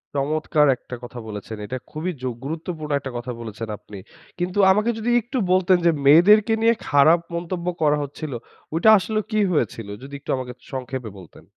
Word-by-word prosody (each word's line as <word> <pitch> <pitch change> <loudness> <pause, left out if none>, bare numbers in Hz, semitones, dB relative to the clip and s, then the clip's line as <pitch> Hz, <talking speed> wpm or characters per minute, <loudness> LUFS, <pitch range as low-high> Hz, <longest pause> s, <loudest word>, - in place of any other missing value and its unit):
চমৎকার 150 +1 +1
একটা 125 - -9
কথা 120 0 -8
বলেছেন। 110 +1 -7
এটা 130 +5 -4
খুবই 160 +4 -3
যোগ 125 -1 -2
গুরুত্বপূর্ণ 155 0 -5
একটা 135 -1 -7
কথা 120 +1 -5
বলেছেন 115 0 -6
আপনি! 105 - -12 0.4
কিন্তু 180 +3 -1
আমাকে 210 +4 +2
যদি 225 +2 -1
একটু 245 +4 -5
বলতেন, 185 0 +4
যে 170 - +6
মেয়েদেরকে 205 +9 +6
নিয়ে 230 +1 +5 0.2
খারাপ 155 +4 +5 0.2
মন্তব্য 175 +1 -4
করা 150 -1 +3
হচ্ছিলো, 145 -2 -6 0.4
ঐটা 175 +7 +4
আসলে 215 +3 -2
কি 215 - +1
হয়েছিলো? 115 - -2
যদি 140 +1 -11
একটু 140 - -5
আমাকে 125 -1 -6 0.2
সংক্ষেপে 130 -3 -5
বলতেন। 90 -4 -15
150 Hz, 170 wpm, -22 LUFS, 125-180 Hz, 0.4 s, যে